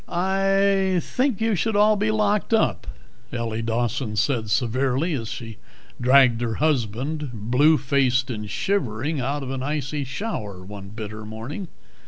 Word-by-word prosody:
"I 195 Hz, +1 st, +2 dB
think 255 Hz, +4 st, -1 dB
you 225 Hz, 0 st, +1 dB
should 215 Hz, +4 st, 0 dB
all 210 Hz, +1 st, +5 dB
be 210 Hz, +1 st, 0 dB
locked 210 Hz, 0 st, +2 dB
up," 220 Hz, -, +1 dB, 0.4 s
Ellie 115 Hz, -2 st, -2 dB
Dawson 115 Hz, 0 st, -1 dB
said 110 Hz, 0 st, 0 dB
severely 130 Hz, -, +1 dB
as 115 Hz, -6 st, -3 dB
she 115 Hz, -1 st, -7 dB, 0.4 s
dragged 125 Hz, -2 st, +5 dB
her 115 Hz, -2 st, -1 dB
husband, 145 Hz, +1 st, -1 dB
blue 125 Hz, +8 st, +3 dB
faced 130 Hz, -2 st, +1 dB
and 105 Hz, -3 st, -5 dB
shivering, 145 Hz, -, -1 dB
out 140 Hz, +3 st, -2 dB
of 130 Hz, -, -5 dB
an 135 Hz, -1 st, -3 dB
icy 145 Hz, 0 st, -2 dB
shower 125 Hz, -, -5 dB
one 100 Hz, 0 st, -9 dB
bitter 110 Hz, 0 st, -7 dB
morning. 115 Hz, -, -6 dB
135 Hz, 145 wpm, -24 LUFS, 115-180 Hz, 0.4 s, all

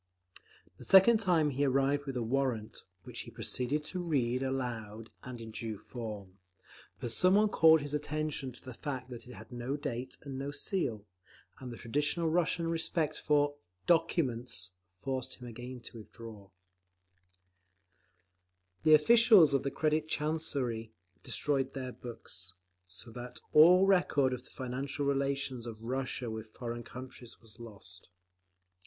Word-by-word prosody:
The -, -, -11 dB
second 200 Hz, +4 st, +7 dB
time 170 Hz, -8 st, +2 dB
he 140 Hz, +2 st, 0 dB
arrived 140 Hz, +1 st, +2 dB
with 135 Hz, -2 st, -3 dB
a 120 Hz, -, -1 dB
warrant, 115 Hz, -3 st, -1 dB, 0.2 s
which -, -, -8 dB
he -, -, -6 dB
proceeded 140 Hz, +4 st, -1 dB
to 185 Hz, -, -4 dB
read 130 Hz, -7 st, 0 dB
aloud 115 Hz, -5 st, -4 dB
in 120 Hz, -3 st, -8 dB
due 110 Hz, -1 st, -4 dB
form; 105 Hz, -5 st, -8 dB, 0.6 s
but 120 Hz, -, -2 dB
some 185 Hz, -, +4 dB
one 210 Hz, +1 st, +4 dB
called 160 Hz, -4 st, +6 dB
his 145 Hz, 0 st, -5 dB
attention 150 Hz, -2 st, -2 dB
to 120 Hz, -, -15 dB
the 130 Hz, -, -8 dB
fact 130 Hz, 0 st, -5 dB
that 120 Hz, -1 st, -9 dB
it 125 Hz, -, -10 dB
had 110 Hz, +3 st, -12 dB
no 120 Hz, +4 st, -3 dB
date 130 Hz, -3 st, -5 dB
and 135 Hz, -2 st, -6 dB
no 140 Hz, +1 st, -3 dB
seal, 145 Hz, -, -2 dB, 0.5 s
and 125 Hz, -2 st, -7 dB
the 120 Hz, -, -8 dB
traditional 145 Hz, +8 st, 0 dB
Russian 170 Hz, 0 st, +1 dB
respect 165 Hz, -1 st, 0 dB
for 145 Hz, -1 st, +2 dB, 0.3 s
"documents" 125 Hz, -, +1 dB, 0.3 s
forced 130 Hz, +4 st, -4 dB
him 125 Hz, -, -11 dB
again 120 Hz, +2 st, -8 dB
to 115 Hz, 0 st, -10 dB
withdraw…. 110 Hz, -2 st, -11 dB, 2.3 s
The 155 Hz, -1 st, +7 dB
officials 210 Hz, -, +6 dB
of 135 Hz, -, +3 dB
the 140 Hz, -, -1 dB
Credit 155 Hz, +2 st, 0 dB
Chancery 140 Hz, -8 st, -1 dB, 0.3 s
destroyed 135 Hz, -2 st, -1 dB
their 130 Hz, -1 st, -4 dB
books, 95 Hz, -7 st, -10 dB, 0.3 s
so 95 Hz, +6 st, -12 dB
that 120 Hz, +1 st, -8 dB
all 180 Hz, +5 st, +8 dB
record 155 Hz, -9 st, +3 dB
of 125 Hz, 0 st, -6 dB
the -, -, -17 dB
financial 135 Hz, +3 st, -4 dB
relations 140 Hz, -3 st, -1 dB
of 110 Hz, -2 st, -7 dB
Russia 130 Hz, -1 st, -2 dB
with 110 Hz, 0 st, -8 dB
foreign 120 Hz, -1 st, -5 dB
countries 125 Hz, -1 st, -10 dB
was 115 Hz, -3 st, -18 dB
lost. 100 Hz, -6 st, -10 dB
130 Hz, 145 wpm, -32 LUFS, 115-150 Hz, 2.3 s, all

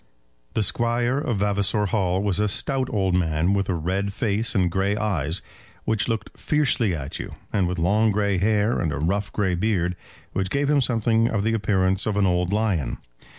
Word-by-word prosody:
The 110 Hz, -, +2 dB
Squire 120 Hz, +5 st, +1 dB
of 125 Hz, -8 st, -1 dB
Vavasor 100 Hz, +1 st, +1 dB
Hall 95 Hz, -2 st, 0 dB
was 100 Hz, -2 st, 0 dB
a 105 Hz, -, +2 dB
stout 130 Hz, +6 st, +1 dB
old 95 Hz, -3 st, 0 dB
man, 85 Hz, +1 st, +1 dB
with 100 Hz, -1 st, 0 dB
a 95 Hz, -, +1 dB
red 95 Hz, +5 st, -2 dB
face 110 Hz, +3 st, -1 dB
and 90 Hz, -3 st, +2 dB
grey 95 Hz, +3 st, 0 dB
eyes, 95 Hz, -6 st, -1 dB, 0.4 s
which 110 Hz, -2 st, 0 dB
looked 115 Hz, -2 st, -3 dB
fiercely 125 Hz, -, +1 dB
at 75 Hz, -2 st, -6 dB
you, -, -, -7 dB, 0.2 s
and 95 Hz, -4 st, +2 dB
with 90 Hz, +1 st, -3 dB
long 105 Hz, +6 st, +2 dB
grey 100 Hz, -2 st, +1 dB
hair, 105 Hz, +3 st, +2 dB
and 80 Hz, -, -1 dB
a 70 Hz, -, -3 dB
rough 95 Hz, +8 st, -1 dB
grey 100 Hz, -3 st, 0 dB
beard, 90 Hz, -2 st, 0 dB, 0.4 s
which 95 Hz, -1 st, -1 dB
gave 140 Hz, +6 st, 0 dB
him 145 Hz, -2 st, +3 dB
something 115 Hz, -1 st, +2 dB
of 110 Hz, -4 st, -1 dB
the 115 Hz, +1 st, +1 dB
appearance 95 Hz, -3 st, +1 dB
of 105 Hz, -2 st, -1 dB
an 100 Hz, -, +3 dB
old 90 Hz, 0 st, +1 dB
lion. 100 Hz, -, 0 dB
100 Hz, 195 wpm, -24 LUFS, 90-110 Hz, 0.4 s, him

